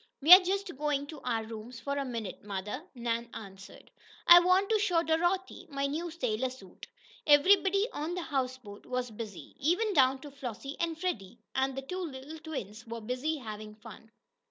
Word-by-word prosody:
"We 310 +6 +9
are 365 - +13
just 385 -1 -2
going 290 -1 0
to 295 0 -10
our 230 -3 -1
rooms 225 +2 -8
for 280 +4 -3
a 280 - -1
minute, 230 -7 -5
mother," 210 - -5
Nan 235 -1 -2
answered. 195 -2 -11 0.3
"I 345 0 +11
want 365 +3 +3
to 435 - +4
show 360 -5 +2
Dorothy 350 +4 0
my 275 -1 -2
new 315 +5 -2
sailor 255 -6 -1
suit." 250 -8 -12 0.4
Every 295 +7 +7
body 395 +2 +1
on 315 +4 -3
the 360 - -3
houseboat 255 -8 -4
was 250 -1 -2
busy, 215 -3 -8
even 360 +9 +1
down 265 -4 +4
to 290 - -9
Flossie 275 0 -6
and 330 -1 -2
Freddie, 235 - -3 0.2
and 265 0 0
the 270 - -3
two 365 +7 -5
little 295 0 -7
twins 245 - -7
were 230 0 -5
busy 255 +8 -2
having 215 -4 -8
fun. 225 0 -13
270 Hz, 180 wpm, -30 LUFS, 230-330 Hz, 0.4 s, are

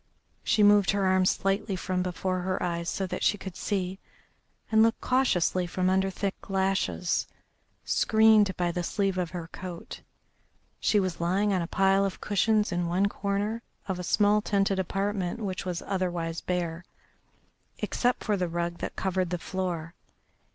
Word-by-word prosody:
She 215 -1 +3
moved 205 -1 +6
her 200 -1 +2
arm 185 0 +3
slightly 195 +1 0
from 185 0 -2
before 185 +1 -2
her 185 +1 -2
eyes 170 -1 -2
so 195 - -2
that 185 - -5
she 205 - +2
could 190 -2 -8
see, 190 -1 -2 0.7
and 220 0 +5
looked 225 0 +3
cautiously 185 -8 +1
from 185 +1 0
under 190 0 +2
thick 195 +1 -4
lashes, 190 -2 0 0.6
screened 220 -3 +4
by 175 -1 +1
the 175 - -2
sleeve 195 +1 -1
of 175 -2 -1
her 170 -2 -6
coat. 180 -2 -8 0.8
She 210 - +3
was 185 -3 -2
lying 195 +4 +1
on 185 - +1
a 170 - -3
pile 195 +1 +3
of 195 -1 -2
cushions 210 +1 +1
in 175 0 -1
one 185 +4 +2
corner 205 +3 -2 0.3
of 185 -2 -2
a - - -4
small 210 +3 +3
tented 195 -2 +1
apartment 195 +1 -2
which 190 -2 -3
was 180 -2 -3
otherwise 175 -4 -2
bare, 175 -1 -2 0.9
except 245 0 0
for 210 - +1
the 185 -2 -1
rug 170 0 -3
that - - -5
covered 185 -2 -1
the 180 - -1
floor. 175 -2 -4
190 Hz, 165 wpm, -28 LUFS, 180-200 Hz, 0.9 s, moved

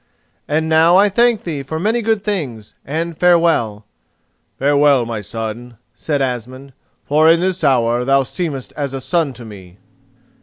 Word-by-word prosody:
And 155 +2 0
now 160 +2 +4
I 200 +2 +5
thank 235 +1 +2
thee 155 -5 -4
for 160 +4 -5
many 220 +6 0
good 220 -2 0
things, 140 - -4
and 165 +4 -4
farewell." 165 -12 +2 0.7
"Farewell, 140 -2 +3
my 115 -2 -5
son," 115 +3 -7 0.2
said 140 +4 -2
Asmund, 130 +2 -5 0.3
"for 155 +2 +3
in 165 0 +5
this 185 -1 -2
hour 120 -3 +2
thou 135 +1 +2
seemest 140 -2 -5
as 140 -2 -4
a - - -4
son 145 +3 -1
to 120 -1 -12
me." 95 -4 -13
140 Hz, 155 wpm, -17 LUFS, 120-170 Hz, 0.7 s, I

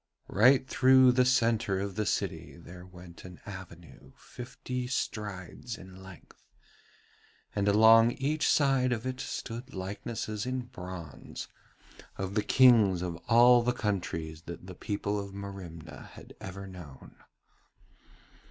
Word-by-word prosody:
Right 130 +5 +4
through 130 -1 +5
the 125 0 +3
centre 115 -6 +2
of 100 0 -3
the 105 +1 -2
city - - -3
there 90 +1 -12
went 90 -2 -13
an 90 -1 -11
avenue 85 -8 -11
fifty 125 0 -6
strides 105 -2 -4
in 95 0 -13
width, 95 -2 -15 1.1
and 100 0 0
along 110 +3 +6
each 150 +3 -1
side 135 -3 +3
of 115 0 -4
it 130 0 -4
stood 120 +1 -6
likenesses 105 +3 -5
in 130 0 -2
bronze 90 - -9 0.7
of 95 0 -4
the 105 - +1
Kings 110 -8 +5
of 90 -2 -3
all 120 +1 +7
the 125 +1 0
countries 85 -8 -3
that 85 +1 -8
the 95 - -9
people 100 +2 -3
of 100 -1 -7
Merimna 90 -5 -9
had - - -13
ever 95 +1 -7
known. 90 -8 -12
100 Hz, 130 wpm, -29 LUFS, 90-125 Hz, 1.1 s, all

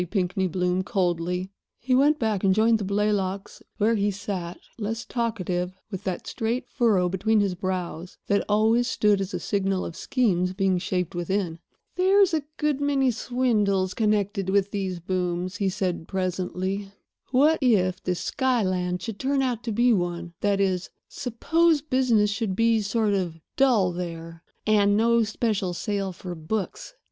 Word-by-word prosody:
Pinkney 190 -1 0
Bloom, 180 +1 0
coldly. 180 -2 -1 0.3
He 255 +2 -1
went 290 +4 +4
back 215 -6 -1
and 190 -1 +4
joined 225 +1 +4
the - - -3
Blaylocks, 200 -1 -1 0.2
where 220 +2 +3
he 205 -2 +1
sat, 195 -3 -4 0.2
less 225 +2 -3
talkative, 185 -7 -2 0.2
with 190 - -6
that 185 -2 -3
straight 230 +3 -2
furrow 215 -8 +2
between 205 +4 +1
his 200 -2 +1
brows 180 -1 -4
that 200 0 +1
always 220 +3 +3
stood 210 -5 +2
as 195 0 -3
a - - -3
signal 195 -2 -1
of 165 - -7
schemes 185 -9 0
being 190 -1 +1
shaped 180 0 -2
within. 175 -1 -2 0.4
"There's 380 0 +4
a 315 - +2 0.2
good 300 -2 0
many 275 -2 +2
swindles 210 -6 0
connected 205 -3 0
with 200 0 +2
these 190 -3 -3
booms," 180 +1 -2
he 195 -2 +1
said 185 -4 -2
presently. 185 +1 -2 0.4
"What 290 +5 +4
if 190 -8 +2
this 180 -1 -2
Skyland 185 -9 0
should 220 -3 -5
turn 270 0 +1
out 245 -3 -2
to 230 - -1
be 240 +3 +3
one—that 175 +1 -1
is, 190 -2 0 0.2
suppose 305 +5 +1
business 245 -7 +2
should 205 -3 -2
be 230 +1 +3
sort 210 +1 0
of 175 -4 -2 0.2
dull 235 -9 +3
there, 165 -2 -6 0.2
and 205 -1 +4
no 235 +1 +4
special 215 -4 -1
sale 200 -1 -2
for 180 0 -7
books?" 190 - -4
200 Hz, 155 wpm, -25 LUFS, 185-230 Hz, 0.4 s, went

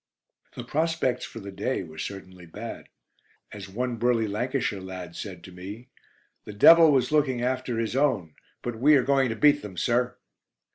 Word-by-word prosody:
The 125 - -6
prospects 155 0 -1
for 115 - -9
"The 100 0 -8
Day" 100 +4 -2
were 80 -2 -11
certainly 95 0 -8
bad. 80 - -8 0.6
As 100 -2 -9
one 120 +4 -3
burly 115 -1 +1
Lancashire 110 -1 -2
lad 90 -2 -8
said 90 -5 -7
to 90 - -11
me: 100 +8 -9 0.5
"the 105 - -9
Devil 165 +9 +8
was 135 +1 +2
looking 135 -5 +1
after 130 -1 -1
his 115 +1 -2
own; 120 - +1 0.3
but 120 -2 -4
we 150 +4 +6
are 135 - +4
going 135 -1 +2
to 115 - -2
beat 145 +4 +4
them, 95 -4 -9
sir." 125 +5 0
120 Hz, 175 wpm, -26 LUFS, 95-130 Hz, 0.6 s, Devil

